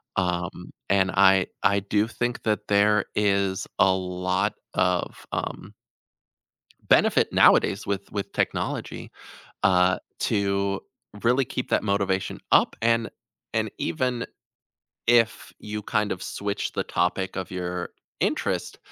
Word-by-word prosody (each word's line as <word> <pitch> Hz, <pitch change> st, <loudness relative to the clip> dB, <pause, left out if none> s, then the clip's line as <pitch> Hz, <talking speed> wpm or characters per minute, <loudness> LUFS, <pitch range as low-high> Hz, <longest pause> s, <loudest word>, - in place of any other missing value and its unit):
Um, 90 Hz, -2 st, -2 dB, 0.2 s
and 95 Hz, -1 st, +3 dB
I 95 Hz, -1 st, +5 dB, 0.2 s
I 100 Hz, +1 st, +4 dB
do 105 Hz, +2 st, +1 dB
think 120 Hz, +1 st, -3 dB
that 105 Hz, -1 st, -1 dB
there 105 Hz, 0 st, +4 dB
is 100 Hz, -2 st, +1 dB
a 95 Hz, -, +6 dB
lot 90 Hz, 0 st, -1 dB, 0.2 s
of, 90 Hz, -1 st, 0 dB
um -, -, -4 dB, 1.1 s
benefit, -, -, +4 dB
nowadays, 100 Hz, +1 st, +4 dB
with 100 Hz, -1 st, -3 dB
with 100 Hz, -1 st, -4 dB
technology, -, -, -3 dB, 0.5 s
uh, 90 Hz, -1 st, +4 dB, 0.2 s
to 100 Hz, -1 st, 0 dB, 0.4 s
really 125 Hz, +3 st, +3 dB
keep 125 Hz, -, -4 dB
that -, -, +2 dB
motivation 100 Hz, -2 st, -1 dB
up -, -, +4 dB
and 115 Hz, 0 st, +2 dB, 0.5 s
and -, -, 0 dB
even 120 Hz, +8 st, -1 dB, 0.8 s
if 115 Hz, -1 st, +3 dB
you 105 Hz, 0 st, -6 dB
kind 105 Hz, 0 st, 0 dB
of 95 Hz, -, -6 dB
switch 100 Hz, 0 st, -3 dB
the -, -, -1 dB
topic 95 Hz, +2 st, -1 dB
of 95 Hz, -, -4 dB
your 90 Hz, -1 st, -4 dB, 0.3 s
interest, -, -, -1 dB
100 Hz, 120 wpm, -25 LUFS, 95-105 Hz, 1.1 s, a